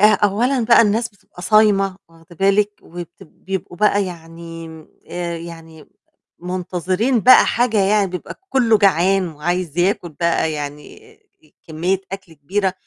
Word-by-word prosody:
آآ 210 - +5
أولًا 225 +5 +1
بقى 235 0 +6
الناس 225 +2 +1
بتبقى 200 -4 -16
صايمة 195 -1 +3
واخدة 165 +1 -19
بالِك. 200 +3 +2
وبت 175 +2 -10
بيبقوا 185 +1 -7
بقى 205 0 +2
يعني 165 -1 -9 0.4
آآ 175 -1 -4
يعني 165 -2 -11 0.5
منتظرين 185 +6 -1
بقى 255 +4 +7
حاجة 235 -2 +1
يعني 200 0 +3
بيبقى 180 - -8
كُلّه 235 -4 +3
جعان 195 -1 +3
وعايز 170 +1 -3
ياكل 175 0 +1
بقى 165 0 0
يعني 150 - -8 0.5
كمية 180 +5 -1
أكل 195 -4 -8
كبيرة، 185 +6 -2
185 Hz, 130 wpm, -19 LUFS, 170-210 Hz, 0.5 s, بقى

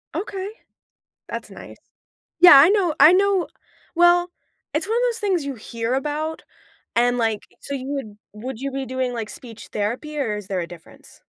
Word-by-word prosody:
Okay. 385 +2 -4 0.8
That's - - -6
nice - - -11 0.6
Yeah, 355 -4 +11
I 280 +3 +8
know 380 -6 +2
I 300 +5 +8
know 390 -1 +2 0.5
Well, 350 +1 +4 0.4
it's 310 +5 -1
one 450 +2 0
of - - +1
those 465 - -6
things 380 -7 0
you 280 -1 -4
hear 230 +1 -4
about, 300 +3 -3 0.5
and, 245 +1 +3
like, 225 -3 0 0.2
so 280 - -6
you 260 -1 -6
would 270 -8 -5 0.2
would 230 +3 -7
you 275 0 -3
be 270 0 -4
doing, 260 0 -2
like, 225 -3 -4
speech 230 -3 -10
therapy, 245 +9 -3
or 220 -7 -1
is 205 -2 -8
there 190 -2 -2
a 170 - -5
difference? 170 -2 -15
275 Hz, 180 wpm, -22 LUFS, 230-350 Hz, 0.8 s, Yeah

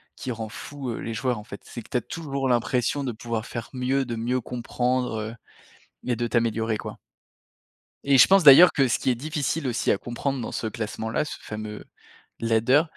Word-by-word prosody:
qui 130 - -5
rend 110 -2 -5
fou 130 +1 -6
les 115 - -5
joueurs 125 +1 -1
en 105 - -8
fait, 100 - -10
c'est 120 - -9
que - - -19
tu - - +2
as - - 0
toujours 140 +1 -3
l'impression 125 +3 +1
de 130 - -2
pouvoir 115 0 -4
faire 120 -2 -6
mieux, 130 +1 0
de 120 -2 -4
mieux 120 +3 -1
comprendre 120 -2 -2 0.7
et 125 -2 0
de 120 0 -1
t'améliorer, 115 -1 0
quoi - - -7 1.1
et 140 -1 +4
je - - +9
pense 195 0 +5
d'ailleurs 150 +5 +10
que 135 -2 +2
ce - - +1
qui 130 - 0
est - - +3
difficile 150 +2 -2
aussi 120 - 0
à - - 0
comprendre 130 +3 -3
dans 115 - -5
ce - - -3
classement-là, 110 +3 -3
ce - - -6
fameux 105 0 -7 0.6
ladder, 115 +5 +3
120 Hz, 195 wpm, -25 LUFS, 115-135 Hz, 1.1 s, d'ailleurs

